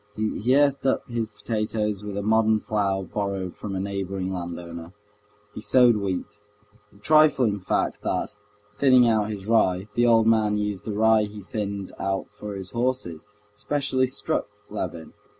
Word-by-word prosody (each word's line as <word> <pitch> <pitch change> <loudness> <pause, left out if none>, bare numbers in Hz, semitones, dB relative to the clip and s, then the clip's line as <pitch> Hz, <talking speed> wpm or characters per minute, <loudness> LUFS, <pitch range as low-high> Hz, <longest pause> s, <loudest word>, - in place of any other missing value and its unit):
He 110 +3 0
earthed 140 -2 +2
up 130 - 0
his 115 -2 -2
potatoes 105 -3 -2
with 100 -1 -5
a 100 - -2
modern 110 0 +3
plough 100 -2 0
borrowed 95 -2 -3
from 100 -2 -6
a - - -2
neighboring 95 -1 -3
landowner. 85 -1 -7 0.6
He - - -7
sowed 120 0 +5
wheat. 100 0 -4 0.5
The - - -21
trifling 130 -4 +4
fact 95 - -1
that, - - -2 0.4
thinning 125 +1 +5
out 110 -2 +2
his 100 -3 -6
rye, 100 -3 +2
the 120 +2 +3
old 115 -1 +5
man 110 -2 +3
used 105 -2 -3
the 110 - -3
rye 110 0 +4
he 105 -1 -10
thinned 100 -1 -4
out 95 0 -2
for 105 -1 -7
his 95 -2 -6
horses, 120 -9 -2 0.3
specially 130 +3 0
struck 140 +4 -2 0.2
Levin. 85 -6 -5
105 Hz, 155 wpm, -25 LUFS, 95-115 Hz, 0.6 s, sowed